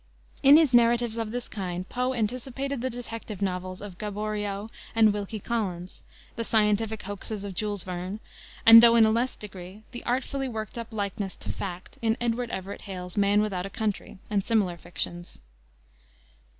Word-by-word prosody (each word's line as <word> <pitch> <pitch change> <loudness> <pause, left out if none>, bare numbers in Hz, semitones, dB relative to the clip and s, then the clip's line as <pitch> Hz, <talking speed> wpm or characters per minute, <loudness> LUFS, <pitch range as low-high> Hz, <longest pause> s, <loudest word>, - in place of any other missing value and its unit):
In 280 +2 +9
his 310 -6 +4
narratives 235 -1 +4
of 225 -1 -2
this 245 +2 -4
kind 185 -3 -4
Poe 250 +1 -1
anticipated 255 +4 -2
the 260 - -1
detective 230 -4 -7
novels 185 -1 -3
of 200 -3 -9
Gaboriau 210 0 -3 0.3
and 220 -2 +6
Wilkie 210 +1 -4
Collins, 185 -5 -3 0.3
the 230 - -2
scientific 215 0 +1
hoaxes 205 +1 -5
of 200 - -5
Jules 205 -1 -2
Verne, 185 +3 -5 0.5
and, 225 0 +12
though 235 0 +7
in 225 -1 +7
a 220 - +4
less 240 +3 0
degree, 195 0 -9
the 240 - -7
artfully 265 +2 -1
worked 220 0 -5
up 230 - -5
likeness 200 -2 -3
to - - -5
fact 185 -1 -7
in 225 0 +1
Edward 240 0 -1
Everett 195 -1 -5
Hale's 180 -3 -7
Man 205 0 +4
Without 195 -3 -2
a - - -9
Country, 215 -3 -3
and 200 -2 0
similar 200 -6 +1
fictions. 175 0 -5
215 Hz, 165 wpm, -27 LUFS, 195-235 Hz, 0.5 s, and